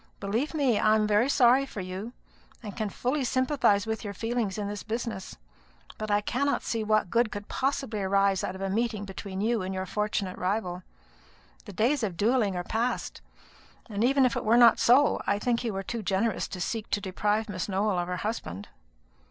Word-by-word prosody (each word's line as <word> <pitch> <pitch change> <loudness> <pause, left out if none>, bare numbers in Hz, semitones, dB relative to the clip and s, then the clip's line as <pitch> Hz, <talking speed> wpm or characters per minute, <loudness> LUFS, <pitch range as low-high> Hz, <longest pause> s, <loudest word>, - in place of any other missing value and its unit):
Believe 230 +11 -2
me, 265 -8 +2
I 215 0 +4
am 215 -1 +2
very 210 +5 +3
sorry 260 -1 +5
for 265 -6 -7
you, 190 +5 -5 0.5
and 205 -2 -7
can 215 -3 -2
fully 260 +7 -1
sympathise 255 -5 +2
with 220 +1 -3
your 200 -2 -5
feelings 225 -2 -2
in 205 -1 -2
this 205 0 -5
business; 220 -3 -5 0.6
but 215 0 -4
I 205 0 +3
cannot 280 +7 0
see 225 -1 -2
what 215 -4 +1
good 235 -2 +2
could 205 0 -6
possibly 265 -5 -2
arise 195 0 +2
out 185 - -3
of 190 - -8
a 195 - -1
meeting 220 -1 -1
between 195 0 -6
you 225 0 +1
and 190 +1 -4
your 185 0 -2
fortunate 205 -1 -2
rival. 180 -1 -2 0.8
The - - -9
days 255 +6 +1
of 195 -6 -2
duelling 215 -2 +2
are 175 - -2
past; 230 +6 -2 0.7
and 205 +1 -1
even 270 +2 +4
if 250 - +1
it - - -2
were 225 +2 +4
not 235 -2 +7
so, 265 +5 +4
I 200 - +2
think 235 +3 0
you 225 -4 -2
are 195 - -3
too 230 +3 -4
generous 200 +3 0
to 185 - -7
seek 215 +4 -3
to - - 0
deprive 210 +3 -1
Miss 185 -2 -4
Nowell 195 -1 +1
of 175 - -2
her 180 0 -3
husband." 135 - -5
215 Hz, 200 wpm, -28 LUFS, 195-235 Hz, 0.8 s, not